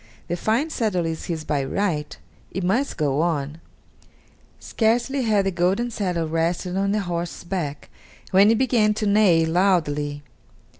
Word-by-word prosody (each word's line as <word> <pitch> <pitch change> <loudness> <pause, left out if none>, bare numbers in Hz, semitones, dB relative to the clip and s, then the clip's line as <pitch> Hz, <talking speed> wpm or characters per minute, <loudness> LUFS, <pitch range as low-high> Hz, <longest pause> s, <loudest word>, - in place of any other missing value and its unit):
The 175 - 0
fine 230 - 0
saddle 205 - 0
is 160 -1 -4
his 160 -3 -4
by 145 -3 -1
right; 150 0 -2 0.3
it 190 - -4
must 235 +10 0
go 145 -2 +1
on." 155 -2 -2 1.0
Scarcely 240 +4 0
had 215 -4 +2
the 195 - +1
golden 190 +7 0
saddle 180 -6 -2
rested 170 +3 -1
on 195 +1 +1
the 210 0 +1
horse's 175 -2 -4
back 170 -6 -4 0.4
when 195 +2 +6
it 225 - +4
began 225 -4 +2
to 215 - -2
neigh 200 -6 +4
loudly. 155 -5 0
180 Hz, 150 wpm, -23 LUFS, 165-210 Hz, 1.0 s, when